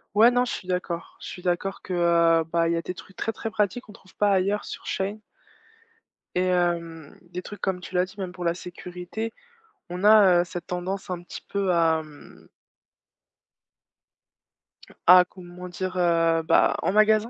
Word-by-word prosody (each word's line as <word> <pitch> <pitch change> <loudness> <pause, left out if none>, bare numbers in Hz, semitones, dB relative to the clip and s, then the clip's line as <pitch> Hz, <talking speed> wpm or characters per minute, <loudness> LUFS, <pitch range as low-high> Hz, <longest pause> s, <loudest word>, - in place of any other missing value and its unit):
Ouais, 230 +3 +7
non, 245 0 +2
je - - -4
suis 185 - -7
d'accord. 175 -2 -3
Je - - -9
suis 180 - -8
d'accord 180 +2 -2
que, - - -10
heu, 170 -1 +3
bah, 165 0 +1
il - - +1
y - - 0
a - - -1
des 180 - -5
trucs 190 +2 -14
très, 225 - -2
très 225 +1 -5
pratiques 210 +4 0
qu'on 210 - -14
trouve 190 -1 -19
pas 205 -1 +2
ailleurs 195 +2 +1
sur - - -8
Shein. 200 +2 -2 1.2
Et 180 - +3
hem, 170 -4 -1
des 180 - -4
trucs, 205 - -10
comme 190 -1 -1
tu 180 +1 -9
l'as 180 - +4
dit, 195 - -16
même 185 -2 -5
pour 180 - -7
la 170 - +2
sécurité, 180 +5 -7 0.6
on 180 +2 -5
a, 205 -5 +7
heu, - - 0
cette 175 0 -7
tendance 185 +2 -4
un 175 -1 -4
petit - - -9
peu 195 -2 0
à, 165 -2 +3
mmh 150 -1 -16 2.6
à 180 0 +9
comment 180 0 -11
dire, 185 +1 -4
heu. 165 -2 +3
Bah, - - +4
en 170 - +1
magasin, 215 +2 +4
180 Hz, 185 wpm, -25 LUFS, 170-195 Hz, 2.6 s, à